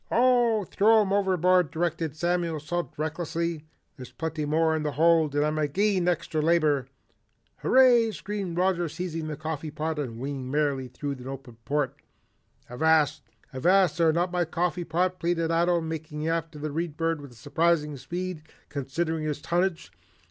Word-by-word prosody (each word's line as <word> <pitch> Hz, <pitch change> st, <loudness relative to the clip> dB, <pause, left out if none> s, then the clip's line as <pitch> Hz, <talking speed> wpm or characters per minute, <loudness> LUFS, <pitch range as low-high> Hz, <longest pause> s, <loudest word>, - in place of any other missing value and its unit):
"Oh, 240 Hz, -3 st, +3 dB
throw 215 Hz, +4 st, +4 dB
'em 195 Hz, -2 st, 0 dB
overboard," 185 Hz, -3 st, +3 dB
directed 165 Hz, -1 st, -2 dB
Samuel 170 Hz, -1 st, -1 dB
Salt 175 Hz, +4 st, -3 dB
recklessly. 160 Hz, +1 st, -3 dB, 0.3 s
"There's 130 Hz, -2 st, -10 dB
plenty 160 Hz, -2 st, -3 dB
more 160 Hz, +1 st, +2 dB
in 160 Hz, -, -1 dB
the 150 Hz, -1 st, -2 dB
hold 160 Hz, -1 st, +3 dB
and 145 Hz, 0 st, +2 dB
I'm 155 Hz, 0 st, -1 dB
agin 180 Hz, +5 st, +1 dB
all -, -, +5 dB
extry 165 Hz, -2 st, -2 dB
labor." 150 Hz, -5 st, +2 dB, 0.7 s
"Hurray!" 245 Hz, -3 st, +5 dB
screamed 200 Hz, -4 st, -5 dB
Roger 180 Hz, -2 st, +1 dB
seizing 165 Hz, -1 st, -4 dB
the 150 Hz, -2 st, -5 dB
coffee 155 Hz, 0 st, -4 dB
pot 155 Hz, +1 st, -3 dB
and 120 Hz, -6 st, -4 dB
winging 135 Hz, 0 st, -5 dB
merrily 140 Hz, -2 st, 0 dB
through 140 Hz, +4 st, -5 dB
an 130 Hz, -2 st, -7 dB
open 135 Hz, -3 st, -8 dB
port. 145 Hz, -2 st, -1 dB, 0.7 s
"Avast! 150 Hz, +2 st, +2 dB, 0.3 s
Avast 175 Hz, +4 st, +3 dB
there! 165 Hz, -1 st, +5 dB
Not 175 Hz, +2 st, 0 dB
my 180 Hz, -1 st, +1 dB
coffee 175 Hz, +1 st, -1 dB
pot!" 180 Hz, +3 st, 0 dB
pleaded 165 Hz, -1 st, 0 dB
Ato, 170 Hz, +1 st, +2 dB
making 160 Hz, -1 st, -5 dB
after 165 Hz, -1 st, -2 dB
the 150 Hz, 0 st, -4 dB
Read 160 Hz, 0 st, -3 dB
Bird 165 Hz, -2 st, 0 dB
with 135 Hz, -4 st, -12 dB
surprising 150 Hz, +4 st, +1 dB
speed 175 Hz, +4 st, -5 dB, 0.3 s
considering 155 Hz, +3 st, -2 dB
his 150 Hz, -1 st, -2 dB
tonnage. 175 Hz, +3 st, -1 dB
160 Hz, 160 wpm, -27 LUFS, 150-175 Hz, 0.7 s, all